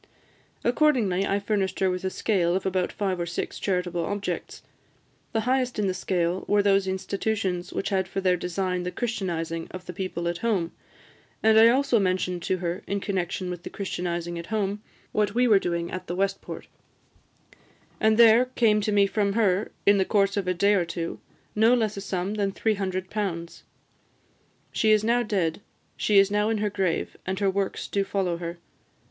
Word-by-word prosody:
Accordingly, 240 -8 +2
I 200 - +1
furnished 200 -2 -1
her 190 - +3
with 180 0 -4
a 190 - 0
scale 180 -3 +1
of 190 - -2
about 185 -1 0
five 190 -3 -2
or 170 - -2
six 175 - -4
charitable 180 -3 -1
objects. 200 +3 -4 0.7
The 225 - 0
highest 250 +1 0
in 210 - +1
the 190 - +1
scale 180 -1 -1
were 205 0 +3
those 195 -1 +3
institutions 190 -1 -2
which - - -2
had 190 -2 0
for 195 - -3
their 185 -1 +3
design 180 +1 -2
the 180 - -3
Christianising 170 -8 -3
of 185 0 -9
the 180 - -7
people 175 -2 -3
at 170 0 -2
home; 195 -8 0 0.7
and 220 0 +6
I 225 - +8
also 255 -1 +3
mentioned 185 -2 0
to 185 - 0
her, 175 +2 -3
in 200 +1 -1
connexion 185 -2 -2
with 175 -1 -6
the - - -7
Christianising 175 -3 -3
at 170 - -8
home, 205 -1 -1 0.3
what 210 0 0
we 250 +1 +4
were 210 -4 +6
doing 170 -2 -2
at 185 0 -6
the 175 - -3
West 195 +1 0
Port; - - -8 1.3
and 220 0 +3
there 230 +1 +7
came 225 -4 +2
to 210 - -1
me 200 -1 +5
from 200 0 0
her, 205 -2 +1
in 200 0 +5
the - - +4
course 195 0 +2
of 200 -3 -1
a 180 - +2
day 200 +4 +3
or 190 -3 +3
two, 170 0 -4 0.3
no 225 +3 +5
less 220 -3 0
a 195 - -5
sum 190 0 -2
than 200 -2 0
£300. 190 -4 -2 1.1
She 220 - +1
is 215 -1 +4
now 235 +2 +3
dead; 195 -7 -1 0.3
she 210 - +2
is 195 0 +5
now 210 +1 +2
in 225 - +1
her 210 0 -1
grave, 190 -4 -1
and 190 +1 -3
her 200 -1 +2
works 195 0 -2
do 200 - 0
follow 190 -3 -1
her. 170 0 -5
195 Hz, 190 wpm, -26 LUFS, 180-210 Hz, 1.3 s, I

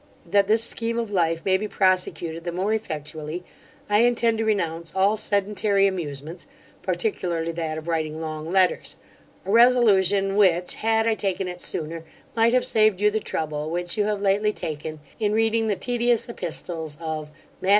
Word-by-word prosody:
That 200 +3 +3
this 220 +2 +3
scheme 230 0 -2
of 230 -3 -2
life 165 -3 0
may 190 -1 +4
be 215 +2 -4
prosecuted 180 -4 0
the 175 - -3
more 190 +5 -1
effectually, 155 -4 -5 0.4
I 210 0 +3
intend 235 -1 +2
to 225 - 0
renounce 170 -6 -1
all 195 +3 +3
sedentary 205 -1 +1
amusements, 160 -4 -4 0.3
particularly 170 - -1
that 160 -2 -3
of 160 +1 -8
writing 160 -2 -2
long 155 0 -5
letters; 185 0 +1 0.5
a 195 - -2
resolution, 205 -5 +4
which, 180 -3 +3
had 225 0 +1
I 225 - +3
taken 195 -3 -2
it 180 0 -7
sooner, 165 +1 -2 0.3
might 230 +1 +3
have 255 - +3
saved 215 -3 +3
you 210 0 +3
the 220 - 0
trouble 155 -5 -3
which 175 +1 -2
you 210 -2 +1
have 210 -1 -1
lately 205 +2 +2
taken 155 -2 -5 0.2
in 210 -1 +1
reading 225 0 +2
the 205 - +1
tedious 240 +1 0
epistles 165 -7 -5
of 155 -2 -4 0.3
MATT. 190 - -1
190 Hz, 170 wpm, -24 LUFS, 165-215 Hz, 0.5 s, may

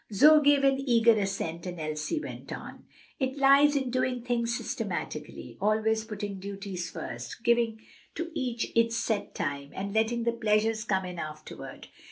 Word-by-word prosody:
Zoe 300 +9 +7
gave 285 -1 +5
an 270 -1 +4
eager 235 -4 +5
assent, 195 -5 -2
and 175 -1 -6
Elsie 155 - -2
went - - -8
on: - - -8 0.3
"It 265 0 -1
lies 280 +1 +6
in 265 -3 0
doing 255 -1 0
things 240 -1 0
systematically, - - -5
always 220 +1 +2
putting 205 -3 -5
duties 195 -2 -5
first, 120 - -7
giving 235 -2 +2 0.4
to 335 0 -4
each 245 -6 -2
its 230 0 +3
set 215 -4 -2
time, 140 -2 -3
and 200 +1 -4
letting 225 +2 +1
the 235 - +2
pleasures 220 -1 +1
come 190 -3 0
in 180 -1 -6
afterward. 155 0 -8
225 Hz, 160 wpm, -29 LUFS, 195-250 Hz, 0.4 s, Zoe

